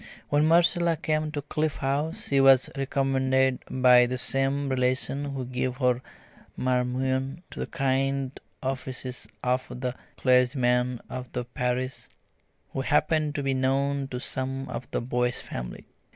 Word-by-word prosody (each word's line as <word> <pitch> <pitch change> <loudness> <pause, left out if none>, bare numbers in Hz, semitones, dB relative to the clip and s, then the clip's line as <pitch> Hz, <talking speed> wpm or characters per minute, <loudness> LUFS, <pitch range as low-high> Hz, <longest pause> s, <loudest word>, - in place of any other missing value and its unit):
When 145 +1 +3
Marcella 170 0 +4
came 155 -1 0
to 145 -2 -4
Cliff 155 +1 -1
House 155 +8 -2
she 140 -1 +4
was 135 -1 +6
recommended 130 -1 +1
by 125 -1 +6
the 130 +1 -2
same 135 +2 0
relation 130 +2 0
who 135 -2 -4
gave 125 0 -2
her 125 -2 +2 0.6
"Marmion" 130 +3 0
to - - -8
the - - -2
kind 135 -2 0 0.2
offices 130 -2 -4 0.2
of 125 +1 0
the 125 0 -3 0.2
clergyman 125 -1 +2
of 130 -1 -7
the 125 -1 -2
parish, 125 0 -2 0.7
who 135 - -1
happened 155 +2 +1
to 145 - -1
be 135 0 +1
known 135 +1 +1
to 125 -2 -5
some 135 +1 -3
of 120 -1 -6
the - - -1
Boyce 125 0 0
family. - - -7
130 Hz, 140 wpm, -27 LUFS, 125-140 Hz, 0.7 s, was